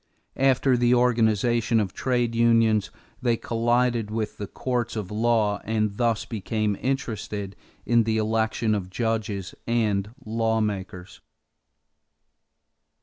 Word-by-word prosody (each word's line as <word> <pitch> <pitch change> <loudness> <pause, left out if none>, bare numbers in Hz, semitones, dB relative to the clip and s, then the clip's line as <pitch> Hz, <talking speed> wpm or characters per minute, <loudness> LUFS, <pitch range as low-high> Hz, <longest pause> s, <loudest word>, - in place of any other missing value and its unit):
After 135 -1 +3
the 120 0 +3
organization 115 -1 +2
of 100 -3 -2
trade 120 -2 0
unions 115 -2 +3 0.3
they 120 -2 +2
collided 120 -1 0
with 110 0 -3
the 100 - -4
courts 120 +1 -2
of 105 -3 -4
law 110 -2 +1
and 105 -2 -1
thus 115 -3 +1
became 110 -1 -2
interested 105 -6 -3 0.3
in 120 -1 +4
the 110 0 0
election 110 0 0
of 95 -3 -2
judges 110 -3 -2
and 105 -4 +1 0.2
lawmakers. 110 -5 -2
110 Hz, 110 wpm, -25 LUFS, 105-120 Hz, 0.3 s, in